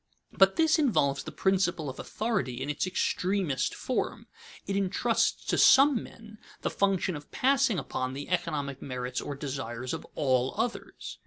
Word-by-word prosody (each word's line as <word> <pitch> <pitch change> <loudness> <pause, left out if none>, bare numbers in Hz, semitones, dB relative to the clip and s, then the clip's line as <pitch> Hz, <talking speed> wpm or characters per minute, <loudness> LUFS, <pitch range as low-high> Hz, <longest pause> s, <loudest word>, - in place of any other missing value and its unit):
But 195 0 +4
this 320 0 +3
involves 140 - +2
the - - -7
principle 185 -5 +1
of 130 - -6
authority 205 - -2
in 140 +3 -2
its 150 - -2
extremest 185 -5 0
form. - - -3 0.4
It 195 - -2
intrusts 200 +4 +1
to - - 0
some 270 -2 +6
men 215 -2 -13 0.2
the - - -1
function 195 -3 +1
of 145 0 -9
passing 265 -5 +2
upon 130 -3 -3
the 140 +1 -6
economic 145 -6 -2
merits 125 -1 -4
or 145 - -5
desires 130 -3 -4
of - - -6
all 130 -2 +1
others. 230 +2 -4
180 Hz, 155 wpm, -29 LUFS, 135-210 Hz, 0.4 s, some